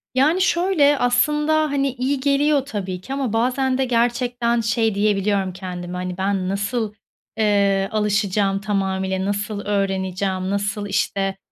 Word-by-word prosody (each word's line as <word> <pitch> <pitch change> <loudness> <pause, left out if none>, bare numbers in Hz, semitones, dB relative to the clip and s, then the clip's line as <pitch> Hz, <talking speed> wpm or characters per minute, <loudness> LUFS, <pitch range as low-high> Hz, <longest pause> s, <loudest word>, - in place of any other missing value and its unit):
Yani, 305 +8 +3
şöyle, 340 -6 +3
aslında, 300 +6 +2
hani, 275 -1 +1
iyi 260 +2 -1
geliyor 280 +1 +2
tabii 190 -8 -4
ki 265 - -6
ama 270 -5 -2
bazen 255 +3 +1
de 265 - +1
gerçekten 240 0 +1
şey 220 -1 +1
diyebiliyorum 200 -2 +1
kendime. 180 -1 -6
Hani, 180 0 -4
"Ben 190 -1 -1
nasıl, 210 +2 -2 0.4
eee, 200 -2 +2
alışacağım 205 -2 +1
tamamıyla, 190 -2 -1
nasıl 205 +1 -2
öğreneceğim, 190 -1 -1
nasıl, 200 +1 -2
işte, 195 0 -1
210 Hz, 130 wpm, -21 LUFS, 195-255 Hz, 0.4 s, Yani